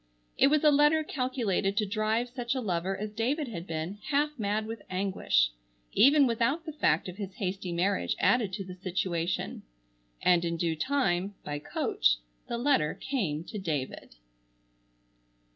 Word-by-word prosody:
It - - +5
was 300 +1 +3
a 300 - +7
letter 295 +2 +4
calculated 245 -9 -1
to 215 - +3
drive 215 +4 0
such 245 +1 -3
a - - 0
lover 190 -3 -1
as 210 +1 -4
David 255 +6 -1
had 175 -4 -6
been, 165 +5 -4
half 295 0 +2
mad 210 +1 0
with 225 -1 -6
anguish, 185 - +1 0.4
even 280 +3 +6
without 240 +7 +1
the 315 - -5
fact 165 - +1
of 180 0 -7
his 195 -3 -6
hasty 190 -3 -3
marriage 185 +3 0
added 230 -6 +3
to 195 0 -3
the 185 - -8
situation. 180 -2 -2 0.6
And 175 -1 +4
in 170 0 -1
due 165 -1 0
time, 195 - 0
by 145 0 -3
coach, - - +1 0.3
the 235 - -2
letter 240 - +2
came 190 - -2
to 210 +4 -6
David. 150 - -4
200 Hz, 160 wpm, -29 LUFS, 175-250 Hz, 0.6 s, a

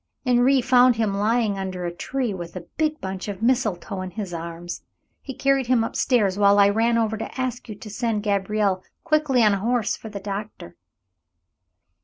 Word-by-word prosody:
Henri 250 +2 +4
found 250 0 +5
him 220 -3 0
lying 210 0 +1
under 185 -2 -4
a 170 - -3
tree 250 +5 -2
with 175 -2 -7
a 180 - -5
big 310 -1 0
bunch 190 0 -5
of 205 +1 -5
mistletoe 215 -6 0
in 185 - -5
his 190 -1 -6
arms. 170 +1 -6 0.4
He 265 - -8
carried 275 -2 +1
him 245 -2 +3
up - - -4
stairs 205 -6 +2
while 200 0 +5
I 200 0 +6
ran 230 +3 +2
over 220 -1 0
to 225 - -7
ask 250 -2 -3
you 215 - -6
to 210 - -11
send 225 -1 -1
Gabriel 200 -1 0 0.2
quickly 305 -6 +2
on 210 -2 +5
a 200 - -1
horse 235 +1 0
for 220 - -10
the 205 -1 -6
doctor." 200 - -6
215 Hz, 190 wpm, -23 LUFS, 195-245 Hz, 0.4 s, I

